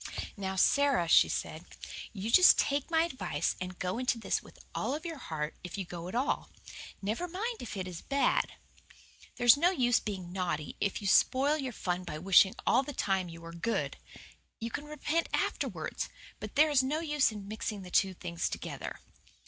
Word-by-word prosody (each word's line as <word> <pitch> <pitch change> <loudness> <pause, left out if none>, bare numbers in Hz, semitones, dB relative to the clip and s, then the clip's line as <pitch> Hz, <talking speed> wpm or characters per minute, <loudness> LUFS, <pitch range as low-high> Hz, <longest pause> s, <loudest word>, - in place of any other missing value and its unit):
"Now, 190 -1 -3
Sara," 275 -1 +3
she - - +6
said, - - -3 0.5
"you 210 +1 -4
just 365 +7 +8
take 280 +1 +1
my 325 -1 +3
advice 190 - -2
and 180 0 -5
go 180 +5 -2
into 250 -2 +1
this 230 - -1
with - - -16 0.2
all 280 - -1
your 330 -4 -5
heart 155 - -4
if 180 +2 -6
you 195 - -3
go 175 0 -7
at 185 - -6
all. 260 +4 0 0.5
Never 220 - -1
mind 435 +7 -3
if 225 - -6
it 185 -1 -3
is 175 -2 -7
bad. 280 0 +1 0.8
There's 240 -1 +7
no 340 +5 +4
use 245 -10 +3
being 190 -5 -5
naughty 170 -5 -2
if 200 +1 -1
you - - -1
spoil 270 +8 +4
your 270 -4 -3
fun 180 -4 -3
by 150 -4 -5
wishing 190 +3 +5
all - - +4
the 285 +2 -6
time 190 -6 0
you 165 0 -10
were 165 0 -9
good. 225 +7 -2 0.6
You 230 +1 -4
can 295 - -4
repent 300 +2 -1
afterwards, - - -2 0.3
but - - -7
there 305 +1 +5
is 280 -3 +5
no 280 +4 -1
use 295 -6 +2
in 205 -2 -8
mixing 210 -1 -4
the 180 - -10
two 190 0 +3
things 170 -1 -3
together." - - -6
220 Hz, 190 wpm, -31 LUFS, 180-285 Hz, 0.8 s, just